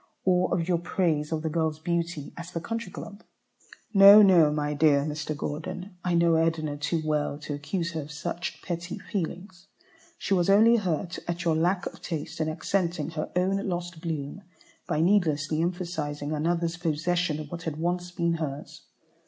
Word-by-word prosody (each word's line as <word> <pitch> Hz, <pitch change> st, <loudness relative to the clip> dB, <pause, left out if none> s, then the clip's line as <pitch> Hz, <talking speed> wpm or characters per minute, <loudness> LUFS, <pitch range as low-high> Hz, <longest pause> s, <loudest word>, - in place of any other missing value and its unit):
or 180 Hz, -1 st, +3 dB
of 170 Hz, -1 st, 0 dB
your 175 Hz, -2 st, +2 dB
praise 165 Hz, -4 st, 0 dB
of 160 Hz, -1 st, -2 dB
the -, -, -1 dB
girl's 160 Hz, -1 st, 0 dB
beauty 170 Hz, -2 st, -3 dB
at 170 Hz, -1 st, -7 dB
the -, -, 0 dB
Country 230 Hz, +2 st, -5 dB
Club? 205 Hz, +1 st, -9 dB, 0.7 s
No, 200 Hz, +1 st, +10 dB
no, 170 Hz, -6 st, +6 dB
my 150 Hz, 0 st, -1 dB
dear 145 Hz, -1 st, +4 dB
Mr. 150 Hz, 0 st, -4 dB
Gordon, 175 Hz, +6 st, -5 dB
I 180 Hz, -1 st, +1 dB
know 170 Hz, -1 st, +4 dB
Edna 160 Hz, -2 st, 0 dB
too 150 Hz, +3 st, -2 dB
well 150 Hz, -2 st, 0 dB
to 150 Hz, 0 st, -6 dB
accuse 165 Hz, +4 st, -3 dB
her 160 Hz, -1 st, -3 dB
of 145 Hz, +1 st, -9 dB
such 170 Hz, +3 st, -5 dB
petty 170 Hz, 0 st, -4 dB
feelings. 180 Hz, -1 st, -5 dB, 0.5 s
She 200 Hz, -, -1 dB
was 180 Hz, -1 st, +2 dB
only 225 Hz, +4 st, +6 dB
hurt 180 Hz, -3 st, -2 dB
at 175 Hz, +1 st, -3 dB
your 165 Hz, -2 st, +3 dB
lack 180 Hz, +4 st, +1 dB
of -, -, -7 dB
taste 160 Hz, 0 st, -4 dB
in 155 Hz, -, 0 dB
accenting 170 Hz, -1 st, -1 dB
her 155 Hz, -1 st, -4 dB
own 185 Hz, +2 st, +2 dB
lost 175 Hz, -2 st, -4 dB
bloom 160 Hz, +1 st, -4 dB, 0.5 s
by 150 Hz, -, 0 dB
needlessly 160 Hz, -5 st, +2 dB
emphasizing 165 Hz, -5 st, -3 dB
another's 165 Hz, +2 st, 0 dB
possession 165 Hz, 0 st, 0 dB
of 150 Hz, -1 st, -8 dB
what 170 Hz, -, -5 dB
had 160 Hz, -2 st, -4 dB
once 175 Hz, +2 st, -1 dB
been 170 Hz, -1 st, 0 dB
hers. 150 Hz, -2 st, -6 dB
170 Hz, 175 wpm, -27 LUFS, 155-180 Hz, 0.7 s, No